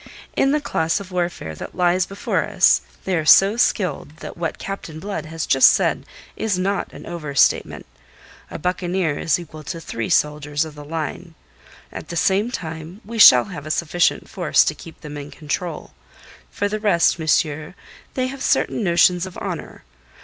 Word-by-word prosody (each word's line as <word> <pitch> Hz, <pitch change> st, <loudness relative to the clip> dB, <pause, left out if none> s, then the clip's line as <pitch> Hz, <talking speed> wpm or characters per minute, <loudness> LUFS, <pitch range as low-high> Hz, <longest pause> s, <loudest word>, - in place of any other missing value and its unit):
In 270 Hz, -, +3 dB
the 300 Hz, -, +2 dB
class 165 Hz, -, -1 dB
of 195 Hz, -2 st, -10 dB
warfare 175 Hz, -, -3 dB
that 75 Hz, -, -9 dB
lies 180 Hz, 0 st, +2 dB
before 195 Hz, +1 st, -1 dB
us -, -, +3 dB, 0.2 s
they 190 Hz, -, 0 dB
are 160 Hz, -, 0 dB
so 195 Hz, +6 st, +6 dB
skilled 180 Hz, -, 0 dB
that -, -, -8 dB
what 170 Hz, -1 st, -3 dB
Captain 170 Hz, -5 st, -7 dB
Blood 165 Hz, -4 st, -5 dB
has 160 Hz, 0 st, -4 dB
just 135 Hz, -, +6 dB
said -, -, 0 dB, 0.3 s
is 215 Hz, -4 st, -1 dB
not 195 Hz, +2 st, -1 dB
an -, -, -11 dB
overstatement. 150 Hz, -5 st, 0 dB, 0.6 s
A -, -, -6 dB
buccaneer 180 Hz, -2 st, -1 dB
is 160 Hz, -, +1 dB
equal 155 Hz, -3 st, -10 dB
to 165 Hz, -, -5 dB
three 115 Hz, -8 st, -5 dB
soldiers 150 Hz, 0 st, +1 dB
of 155 Hz, -, -9 dB
the 150 Hz, 0 st, -10 dB
line. 160 Hz, +2 st, -5 dB, 0.6 s
At -, -, -8 dB
the 170 Hz, -, -5 dB
same 200 Hz, +7 st, +2 dB
time 165 Hz, -2 st, -7 dB
we 230 Hz, +2 st, -6 dB
shall 125 Hz, -, +9 dB
have 145 Hz, +1 st, -8 dB
a -, -, -6 dB
sufficient 170 Hz, +2 st, +1 dB
force 175 Hz, -4 st, +2 dB
to -, -, 0 dB
keep 165 Hz, +1 st, -13 dB
them 150 Hz, -1 st, -8 dB
in 145 Hz, 0 st, -7 dB
control. 155 Hz, +2 st, -5 dB, 0.6 s
For 205 Hz, -, -2 dB
the 215 Hz, +1 st, -3 dB
rest, 175 Hz, -6 st, +2 dB
monsieur, 155 Hz, +1 st, 0 dB, 0.4 s
they 255 Hz, -, 0 dB
have 265 Hz, +1 st, -6 dB
certain 230 Hz, -, +1 dB
notions 175 Hz, 0 st, +3 dB
of 185 Hz, -, -11 dB
honour. -, -, -6 dB
170 Hz, 175 wpm, -21 LUFS, 155-190 Hz, 0.6 s, shall